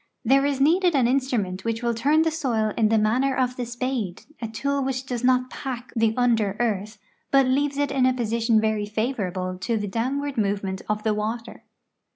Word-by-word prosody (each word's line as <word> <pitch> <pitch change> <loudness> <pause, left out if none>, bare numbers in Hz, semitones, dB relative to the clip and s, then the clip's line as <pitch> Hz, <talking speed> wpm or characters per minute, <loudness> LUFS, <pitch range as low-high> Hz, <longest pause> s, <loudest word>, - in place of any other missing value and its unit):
There 275 +4 +4
is 280 -2 -1
needed 345 +4 +3
an 255 -4 +4
instrument 240 -8 0
which 230 +1 -2
will 235 0 +1
turn 290 +7 +3
the 325 - +1
soil 230 -9 -1
in 220 -2 +2
the 225 - +3
manner 250 +6 +2
of 250 -1 0
the 245 -2 -4
spade, 240 -6 -3 0.2
a 230 - -2
tool 280 +6 -1
which 260 0 -2
does 250 -3 -4
not 255 0 +2
pack 255 -2 -6
the 225 -1 +2
under 225 -5 +2
earth, 215 -2 -1 0.3
but 275 -1 +5
leaves 280 +2 +1
it 285 0 0
in 255 -1 +3
a 255 - +3
position 230 -1 +1
very 215 -1 0
favorable 190 -5 -2
to 225 +5 -1
the 205 -1 -3
downward 270 +6 -2
movement 195 -2 -1
of 210 0 -1
the 220 -2 +1
water. 220 +3 -4
235 Hz, 195 wpm, -24 LUFS, 215-265 Hz, 0.3 s, but